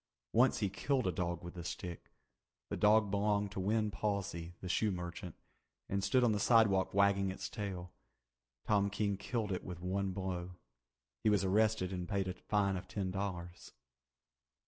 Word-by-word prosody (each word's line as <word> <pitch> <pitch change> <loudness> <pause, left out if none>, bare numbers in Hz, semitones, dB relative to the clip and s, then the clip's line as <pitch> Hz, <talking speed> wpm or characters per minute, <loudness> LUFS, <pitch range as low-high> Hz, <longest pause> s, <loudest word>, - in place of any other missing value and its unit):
Once 125 +3 +5
he 100 - +1
killed 130 +7 0
a 90 - +2
dog 85 0 -2
with 85 - -7
the 85 - -7
stick. 85 +1 -6 0.6
The - - 0
dog 105 -1 +4
belonged 100 0 +1
to 100 - -5
Win 105 +2 +1
Pawsey, 100 -5 -3
the 95 - -6
shoe 105 +4 +2
merchant, 90 -2 -5 0.5
and 100 0 -1
stood 130 +4 +3
on 120 - +4
the 105 - 0
sidewalk 105 -4 +4
wagging 100 -1 +4
its 95 - -4
tail. 95 -4 -5 0.7
Tom 100 -2 +3
King 100 0 0
killed 105 +1 -2
it 95 - -2
with 90 -2 -6
one 95 +2 -1
blow. 90 -1 -4 0.7
He 110 - +4
was 105 -2 +3
arrested 105 -1 +2
and 90 0 -4
paid 100 -2 0
a 90 - -2
fine 100 0 0
of 90 0 -7
ten 95 -2 -2
dollars. 90 -3 -5
100 Hz, 170 wpm, -35 LUFS, 90-105 Hz, 0.7 s, Once